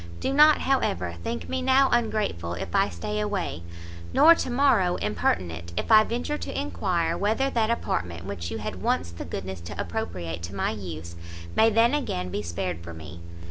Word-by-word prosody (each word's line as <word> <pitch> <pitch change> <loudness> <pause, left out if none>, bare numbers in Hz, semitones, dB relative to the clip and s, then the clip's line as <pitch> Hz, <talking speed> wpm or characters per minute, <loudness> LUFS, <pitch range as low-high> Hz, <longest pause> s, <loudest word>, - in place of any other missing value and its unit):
Do 270 - -1
not, 300 +2 +6
however, 90 - 0
think 80 +1 -4
me 85 0 -2
now 270 +1 +4
ungrateful 215 - 0
if 85 - -6
I 195 0 +3
stay 210 0 -4
away, 200 - -2 0.5
nor 330 - +8
to 330 - -3
morrow 240 -9 +3
impertinent, 85 -5 -1
if - - -2
I 215 0 +9
venture 245 +7 -3
to - - -4
enquire 175 - -1
whether 225 +7 +1
that 225 -2 +1
apartment 85 - -2
which 90 -4 -5
you - - -4
had - - -5
once 85 0 0
the 85 - -7
goodness 95 +1 -6
to 85 - -8
appropriate 85 -1 -4
to 85 +3 -7
my - - 0
use, 85 -5 -7 0.4
may 225 - +6
then 230 +3 +4
again 90 - -2
be 100 - -3
spared 85 -1 -4
for 85 -1 -8
me! 80 +1 -10
100 Hz, 180 wpm, -26 LUFS, -, 0.5 s, I